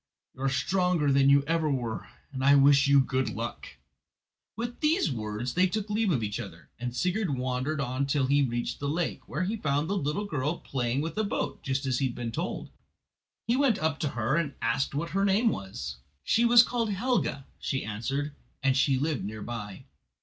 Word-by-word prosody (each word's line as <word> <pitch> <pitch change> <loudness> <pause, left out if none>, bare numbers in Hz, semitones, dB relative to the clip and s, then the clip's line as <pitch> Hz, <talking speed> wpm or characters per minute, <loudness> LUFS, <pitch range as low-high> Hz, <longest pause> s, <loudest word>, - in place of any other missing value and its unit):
You 130 - -12
are 135 - +2
stronger 160 +2 +1
than 135 0 +5 0.2
ever 160 0 +1
you 140 - +2
were, 120 -4 -4 0.3
and 130 -1 -3
I 140 +1 +6
wish 140 +1 +6
you 140 -1 +6
good 130 0 0
luck." 115 +2 -5 0.9
With 240 +2 -5
these 310 - +2
words 110 +1 -3
they 185 +1 +4
took 210 +2 -3
leave 215 0 +1
of 125 -8 +1
each 105 +1 -2
other, 85 - -9
and 120 0 -4
Sigurd 180 - 0
wandered 130 +4 -1
on 130 +1 -1
till 140 -1 +1
he 140 +2 +3
reached 120 -3 -1
the 140 - -2
lake, 165 +2 -1
where 160 - -2
he 210 +5 -1
found 145 -3 0
the 200 - -1
little 185 +4 -1
girl 150 -2 -1
playing 125 0 -2
with 165 +6 -3
a - - +2
boat, 200 - -2
just 135 0 -2
as 130 -2 0
he 135 - +2
had 120 - -6
been 120 -2 -4
told. - - -4 0.7
He 235 - +2
went 260 -5 +3
up 160 -4 -1
to 155 - 0
her 120 +6 +1
and 150 -5 -1
asked 115 +5 0
what 165 +3 -2
her 195 +2 +1
name 200 +4 +3
was. 95 - -5 0.3
She 235 - +3
was 235 0 +8
called 235 -2 -1
Helga, 205 - 0
she 135 - -2
answered, 135 +8 -3 0.3
and 135 -1 +3
she 135 0 +3
lived 145 -3 -1
near 105 +1 -5
by. 105 -5 -6
140 Hz, 205 wpm, -28 LUFS, 125-180 Hz, 0.9 s, was